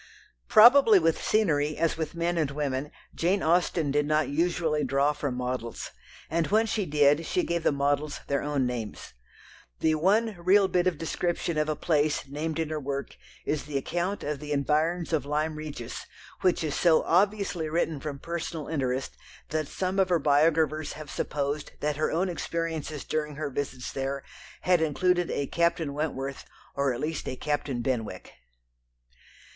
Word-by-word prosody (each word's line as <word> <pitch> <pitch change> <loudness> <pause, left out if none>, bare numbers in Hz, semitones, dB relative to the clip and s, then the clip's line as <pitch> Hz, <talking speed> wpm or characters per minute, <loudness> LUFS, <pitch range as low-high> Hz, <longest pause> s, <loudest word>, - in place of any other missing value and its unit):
Probably 235 -1 +8
with 165 -2 +1
scenery 155 -8 +2
as 165 0 +1
with 160 0 -4
men 170 +1 0
and 155 -4 +1
women 140 0 -2 0.2
Jane 185 +4 +1
Austen 165 -3 +2
did 145 +1 +1
not 155 -1 +2
usually 160 0 +1
draw 140 +2 +2
from 145 -3 -3
models, 125 -2 -4 0.4
and 165 0 0
when 220 +2 +3
she 210 -3 -1
did, 145 +1 +4
she 180 +2 0
gave 170 0 -1
the - - +2
models 145 +1 0
their 140 -1 0
own 145 -3 0
names. 115 - -5 0.7
The 160 - +3
one 205 +7 +2
real 190 +3 +5
bit 180 -1 +1
of 175 -4 0
description 170 +1 -2
of 155 0 0
a 155 - 0
place 150 -1 +1
named 155 +3 -3
in 160 -2 -1
her 155 -1 -2
work 140 0 -4 0.3
is 150 -1 -1
the 145 -2 -2
account 175 +8 -2
of 150 -1 -3
the 150 0 -7
environs 155 +4 0
of 150 -5 +2
Lyme 155 +2 0
Regis, 150 -6 -7 0.3
which 180 -2 +2
is 150 -3 -1
so 165 -3 +4
obviously 195 -3 +1
written 160 -2 0
from 145 -1 -5
personal 165 0 -5
interest 135 -4 -2 0.3
that 155 -1 -1
some 185 +4 -2
of 190 -1 +3
her 175 - +4
biographers 155 +1 +2
have 155 -2 -9
supposed 145 +1 -2
that 150 -1 -1
her 155 - 0
own 180 +4 +1
experiences 165 -4 -3
during 150 -1 -2
her 145 -1 -4
visits 130 -2 -4
there 135 0 -3 0.4
had 180 -2 +3
included 175 +3 +1
a 140 - -1
Captain 170 -1 0
Wentworth 140 -2 -3 0.3
or 140 -1 +1
at 120 - -4
least 155 0 -3
a - - -4
Captain 140 -3 -2
Benwick. 110 -8 -3
155 Hz, 170 wpm, -27 LUFS, 140-170 Hz, 0.7 s, Probably